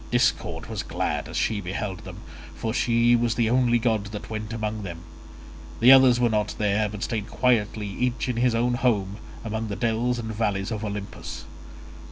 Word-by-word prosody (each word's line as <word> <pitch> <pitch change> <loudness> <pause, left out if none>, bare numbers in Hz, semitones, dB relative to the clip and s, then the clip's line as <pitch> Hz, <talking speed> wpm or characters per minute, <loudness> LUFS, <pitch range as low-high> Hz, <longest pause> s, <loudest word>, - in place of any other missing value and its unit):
Discord - - +1
was - - -4
glad - - -3
as - - -4
she 105 -2 0
beheld 95 +1 -4
them, 95 +2 -9 0.3
for 110 +7 -3
she 120 0 +3
was 120 -1 +1
the 115 -2 +1
only 125 -1 +3
god 110 -3 0
that 105 +1 -8
went 110 0 -4
among 110 -1 -3
them; 85 -3 -7 0.8
the 125 +3 +8
others 130 -2 +7
were 120 - +4
not 105 -1 0
there, 105 0 +1
but 105 0 -6
stayed 110 -1 -3
quietly 110 -4 +1
each 125 +6 -2
in 125 -2 -2
his 120 -1 +2
own 120 +1 +1
home 105 -6 0 0.3
among 110 0 -3
the 100 - -4
dells 120 +2 0
and 110 -2 -4
valleys 105 -1 -1
of 110 -1 -3
Olympus. 100 -2 -6
110 Hz, 185 wpm, -25 LUFS, 105-120 Hz, 0.8 s, the